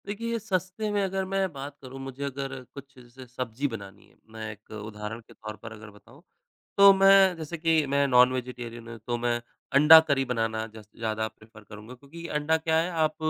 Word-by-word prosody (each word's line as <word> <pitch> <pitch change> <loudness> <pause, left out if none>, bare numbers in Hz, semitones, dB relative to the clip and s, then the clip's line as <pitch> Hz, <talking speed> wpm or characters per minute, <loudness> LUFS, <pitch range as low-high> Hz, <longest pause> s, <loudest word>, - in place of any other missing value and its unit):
देखिए 230 +3 -3
सस्ते 190 +1 -2
में 205 -1 +1
अगर 190 0 -2
मैं 195 -1 0
बात 140 +1 -8
करूँ, 135 0 -10
मुझे 135 +1 -7
अगर 135 -1 -5
कुछ 140 0 -11
स 125 +1 -14
सब्ज़ी 130 +2 -2
बनानी 100 -4 -9
है - - -27 0.2
मैं 110 -1 -6
एक 105 0 -16
उदाहरण 105 +1 -7
के - - -19
तौर 110 0 -8
पर 115 - -8
अगर 110 0 -11
बताऊँ 115 +7 -18 0.6
तो 200 0 +9
मैं 195 -1 +6
जैसे 160 +1 -6
कि 160 -1 +2
मैं 140 +1 +2
नॉन-वेजिटेरियन 125 -2 +1
हूँ 115 - -8
तो 120 -1 -1
मैं 120 0 -1 0.3
अंडा 150 +3 +10
करी 135 -2 +1
बनाना 115 -3 -1
जस 110 -1 -12
ज़्यादा 110 -1 -1
प्रेफ़र 110 0 -17
करूँगा। 105 +4 -11
क्योंकि 145 +6 -12
अंडा 150 +1 +1
क्या 160 0 0
है 170 +2 0
आप 155 -2 0
135 Hz, 195 wpm, -27 LUFS, 115-160 Hz, 0.6 s, अंडा